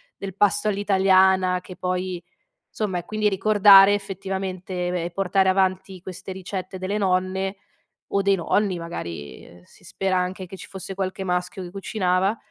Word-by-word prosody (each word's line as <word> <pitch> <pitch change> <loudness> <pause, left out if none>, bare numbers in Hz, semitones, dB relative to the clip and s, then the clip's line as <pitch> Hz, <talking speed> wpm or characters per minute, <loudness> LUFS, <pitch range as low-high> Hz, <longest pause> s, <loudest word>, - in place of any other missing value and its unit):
del 195 -2 -7
pasto 205 +1 +2
all'italiana, 190 -2 +3
che 180 0 -11
poi, 180 -1 -3 0.5
insomma 190 -5 -2
è - - -8
quindi 215 +1 0
ricordare 200 0 +7
effettivamente 190 -2 -4
e - - -1
beh, 175 -1 -2
portare 190 +1 +2
avanti 190 0 0
queste 185 +1 -8
ricette 185 0 -6
delle 190 +3 -2
nonne, 190 0 0 0.6
o 200 - +4
dei 195 0 +3
nonni, 195 +1 0
magari, 85 - -7
ehm, 85 0 -16
si 90 - -22
spera 190 +1 -2
anche 185 +1 -2
che 185 - -10
ci - - -11
fosse 195 0 -7
qualche 190 0 -3
maschio 180 +3 -2
che 175 - -9
cucinava; 195 +1 0
190 Hz, 160 wpm, -23 LUFS, 180-195 Hz, 0.6 s, ricordare